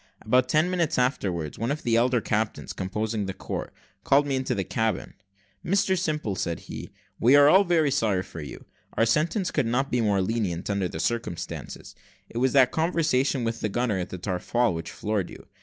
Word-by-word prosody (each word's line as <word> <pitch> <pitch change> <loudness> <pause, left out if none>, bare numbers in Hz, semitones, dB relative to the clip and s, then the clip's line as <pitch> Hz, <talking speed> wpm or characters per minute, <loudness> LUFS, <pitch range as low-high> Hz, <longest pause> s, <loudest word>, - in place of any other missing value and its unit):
About 125 +3 +3
ten 155 +6 +3
minutes 170 -4 0
afterwards, 95 - -1
one 115 +2 -1
of 145 +2 -2
the 115 -1 +2
elder 120 +1 +3
captains 105 -2 -2
composing 105 +2 -2
the 95 - -4
court - - -5 0.3
called 140 +1 +4
me 140 -2 -1
into 130 -1 -1
the 95 - -1
cabin. 110 +3 -2 0.5
"Mr 190 +1 +2
Simple," 150 - -1
said 85 -4 -3
he, - - -8 0.3
"we 125 +5 +5
are 145 0 +8
all 190 +6 +7
very 165 -6 +2
sorry 100 -7 +1
for 85 - -9
you. 70 - -9 0.3
Our 115 - +4
sentence 165 - +1
could 145 -6 0
not 130 +4 0
be 125 - +2
more 105 -3 +2
lenient, 95 -4 -2
under 100 -2 0
the 80 - -7
circumstances: 100 -6 -4 0.4
it 115 - -3
was 130 +1 +2
that 130 -3 +5
conversation 155 -6 +1
with 115 0 -2
the 105 - 0
gunner 115 -2 0
at 90 - -4
the 95 - -6
taffrail 100 +5 0
which 80 0 -5
floored 105 -3 -2
you. - - -12
115 Hz, 195 wpm, -26 LUFS, 100-140 Hz, 0.5 s, are